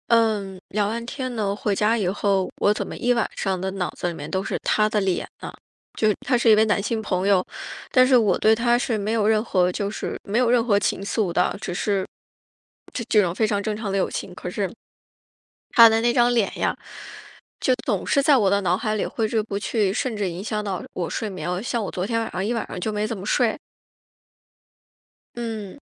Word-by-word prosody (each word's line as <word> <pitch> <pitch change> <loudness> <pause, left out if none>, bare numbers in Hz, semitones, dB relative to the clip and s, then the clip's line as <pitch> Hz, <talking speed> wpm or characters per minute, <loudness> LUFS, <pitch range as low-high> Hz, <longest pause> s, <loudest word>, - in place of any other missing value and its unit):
嗯， 215 -5 +2
聊 205 0 0
完 230 +1 -4
天 255 0 -4
呢， 200 -3 -1
回 205 0 -1
家 215 +3 +2
以 200 -5 0
后， 195 0 0
我 205 - +3
怎 - - -3
么 - - -7
一 245 0 +2
晚 235 -2 0
上 190 -2 -1
的 190 +1 -2
脑 190 -2 -2
子 - - -4
里 175 - -2
面 150 -2 -7
都 190 0 -1
是 - - -2
他 215 0 +2
的 215 - +1
脸 190 -3 -1
呢？ - - -7 0.4
就 215 - +2
是 210 - +3
他 250 -1 +3
是 235 -1 +3
一 - - +8
位 215 +1 +4
男 210 -2 +1
性 220 +2 -2
朋 190 -2 -1
友， 190 -2 +3 0.5
但 255 0 +6
是 255 -1 +5
我 210 -6 +3
对 220 - +4
他 240 +2 +2
是 240 -2 -1
没 210 +1 -2
有 220 -2 +1
任 215 -1 +3
何 180 -5 +2
就 200 +2 -2
是 210 - -5
没 210 +2 -2
有 245 -1 +3
任 240 -2 +3
何 205 -4 +3
情 195 - -1
愫 200 -1 -1
的， 180 +3 +1
只 - - -4
是， 195 +1 0 0.9
这 240 - -3
这 210 - +5
种 175 -3 0
非 220 +4 +1
常 205 -1 0
正 215 0 -2
常 215 -1 -4
的 195 - 0
友 190 - +1
情， - - -5
可 - - -6
是 - - -2 1.0
他 230 -4 +9
的 225 0 +2
那 240 +1 +2
张 240 0 +3
脸 225 -5 +1
呀， - - 0 0.8
就 260 - +2
总 205 -6 -1
是 280 - +3
在 285 0 +5
我 205 -6 +3
的 200 0 +3
脑 180 -1 +2
海 215 +1 -2
里 205 - -1
挥 220 -1 -2
之 220 0 +1
不 205 -2 -5
去， 205 -1 0
甚 230 +2 -2
至 205 -2 -1
影 175 +2 -6
响 210 0 -3
到 190 -3 -3
我 175 -2 -2
睡 220 - -3
眠。 180 0 -3
像 235 -1 -2
我 - - -4
昨 180 - -3
天 230 +1 0
晚 225 - -3
上， 185 - -2
一 220 - 0
晚 230 - -2
上 - - -7
就 215 - -1
没 210 0 -1
怎 225 - -4
么 190 - -8
睡。 230 0 +2 1.8
嗯。 225 -1 -6
210 Hz, 255 characters per minute, -23 LUFS, 195-230 Hz, 1.8 s, 他